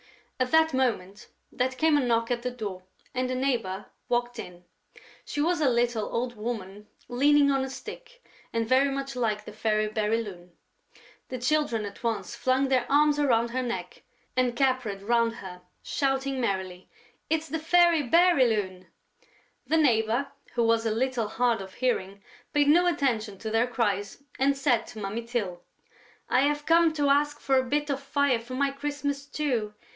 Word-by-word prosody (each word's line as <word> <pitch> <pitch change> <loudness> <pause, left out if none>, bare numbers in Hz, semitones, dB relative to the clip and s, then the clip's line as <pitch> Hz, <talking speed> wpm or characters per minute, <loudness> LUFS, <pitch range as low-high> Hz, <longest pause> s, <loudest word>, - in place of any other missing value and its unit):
At 255 0 +1
that 320 0 +4
moment, 215 -7 -1 0.2
there 255 +1 0
came 305 +4 +2
a 290 - +3
knock 230 -1 +1
at 240 -1 0
the 250 - -2
door 210 -7 -6 0.3
and 255 0 -1
the 255 - -1
neighbour 230 -8 -1 0.2
walked 240 -1 -1
in. 175 0 -9 0.6
She 290 - -5
was 335 +2 +1
a 285 - +4
little 240 -3 0
old 240 +1 -2
woman 210 -2 -6 0.2
leaning 285 +3 +4
on 270 -1 +1
a 265 - -4
stick - - -10 0.3
and 230 -1 -1
very 260 +3 +4
much 275 0 -4
like 215 -4 -1
the - - -8
Fairy 215 0 0
Bérylune. 210 -4 -2 0.8
The 255 - -4
Children 245 -4 0
at 200 - -9
once 220 -5 -2
flung 260 +1 +1
their 255 -2 +1
arms 295 +1 +4
around 235 -5 +2
her 255 +1 -1
neck 190 -8 -5 0.3
and 250 -1 +1
capered 250 -7 0
round 230 +1 +2
her, 180 -4 -9 0.2
shouting 270 -1 -1
merrily: 190 -4 -3 0.4
"It's 320 0 0
the 320 - -3
Fairy 340 0 +4
Bérylune!" 235 - +2 0.8
The 320 - +2
neighbour, 240 -2 +2 0.3
who 240 - +2
was 230 0 +2
a - - +1
little 240 0 0
hard 235 -1 +1
of 190 -1 -10
hearing, 200 -6 -2 0.3
paid 290 -1 +3
no 345 +4 +5
attention 230 - 0
to 220 +2 -5
their 225 +2 +2
cries 210 -1 -2 0.2
and 275 +1 +2
said 245 -4 +1
to 235 -3 -9
Mummy 210 +3 -3
Tyl: 220 -7 -3 0.7
"I 255 - +3
have 295 +1 0
come 330 0 +5
to 290 -2 +1
ask 295 +1 +2
for 270 -1 +2
a - - 0
bit 290 +3 -1
of 275 0 -2
fire 275 -3 +1
for 240 +3 -8
my 280 +1 +1
Christmas 285 0 -3
stew.... 255 -7 -2
250 Hz, 170 wpm, -27 LUFS, 220-280 Hz, 0.8 s, no